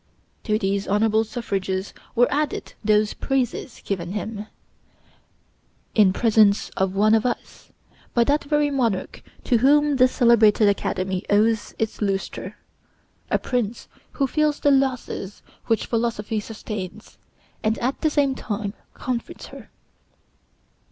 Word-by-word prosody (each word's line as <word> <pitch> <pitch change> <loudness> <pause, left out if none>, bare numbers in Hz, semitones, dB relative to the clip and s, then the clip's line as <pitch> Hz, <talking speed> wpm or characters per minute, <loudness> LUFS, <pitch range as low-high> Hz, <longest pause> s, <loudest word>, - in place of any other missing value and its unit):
To 215 -2 +2
these 195 -1 -1
honorable 220 +2 +2
suffrages 195 -4 -3 0.2
were 245 - +5
added 295 0 -2
those 215 0 +3
praises 260 -2 -2
given 180 -2 -3
him, 210 0 -5 1.5
in 205 -4 +5
presence 215 -1 +3
of 190 0 -1
one 215 +2 +4
of 220 -1 +4
us, 250 - -5 0.4
by 235 - +5
that 285 +4 +1
very 295 0 +1
monarch 235 -8 -1 0.2
to 240 -4 +2
whom 290 +2 +4
this 255 0 +5
celebrated 225 -3 +5
Academy 190 -2 -1
owes 215 +1 +2
its 225 0 -3
lustre; 195 -2 -3 0.7
a - - +3
prince 240 -3 -2 0.3
who 275 - +1
feels 300 +2 +1
the 285 - +3
losses 260 -7 -1 0.2
which 225 -2 +1
Philosophy 225 -2 -1
sustains, 210 -2 -7 0.4
and 220 +1 +1
at 255 +3 -2
the 315 - +3
same 285 -2 +2
time 205 -4 -4 0.2
comforts 245 -2 -4
her. - - -11
220 Hz, 125 wpm, -23 LUFS, 205-255 Hz, 1.5 s, were